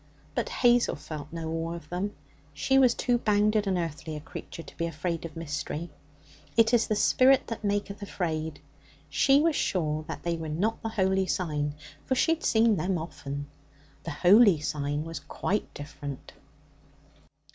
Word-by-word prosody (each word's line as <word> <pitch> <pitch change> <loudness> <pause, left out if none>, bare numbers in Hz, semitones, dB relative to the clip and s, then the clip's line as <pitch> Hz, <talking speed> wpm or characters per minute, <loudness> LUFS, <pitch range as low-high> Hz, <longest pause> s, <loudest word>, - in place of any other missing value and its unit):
But - - -1
Hazel 245 - +3
felt 150 0 -8
no 165 -1 -4
awe 165 +1 -2
of 155 -3 -10
them; 190 +4 -3 0.4
she 270 0 +3
was 250 -3 +5
too 245 -1 +1
bounded 210 -1 +2
and 190 -2 +1
earthly 160 -2 -4
a - - -4
creature 165 +2 -9
to - - -14
be 170 - -1
afraid 170 0 -3
of 165 -1 -8
mystery. 155 +1 -4 0.7
It 230 +1 +5
is 235 -1 +4
the 215 - +1
spirit 260 +5 +4
that 230 -1 -6
maketh 205 0 -1
afraid. 160 -6 -3 0.5
She 275 +1 +4
was 325 -1 +2
sure 155 - 0
that - - -6
they 170 -1 -1
were 160 -1 -5
not 200 +9 -1
the 225 - -3
Holy 190 -3 +1
Sign, 150 -6 -1 0.3
for 260 - 0
she 325 +5 +3
had 330 - -6
seen 220 -2 +4
them 180 +3 0
often. 145 -3 -6 0.6
The - - -5
Holy 185 +3 +6
Sign 145 0 -2
was 165 -2 -6
quite 200 +7 -2
different. 145 -1 -8
175 Hz, 170 wpm, -28 LUFS, 155-215 Hz, 0.7 s, Holy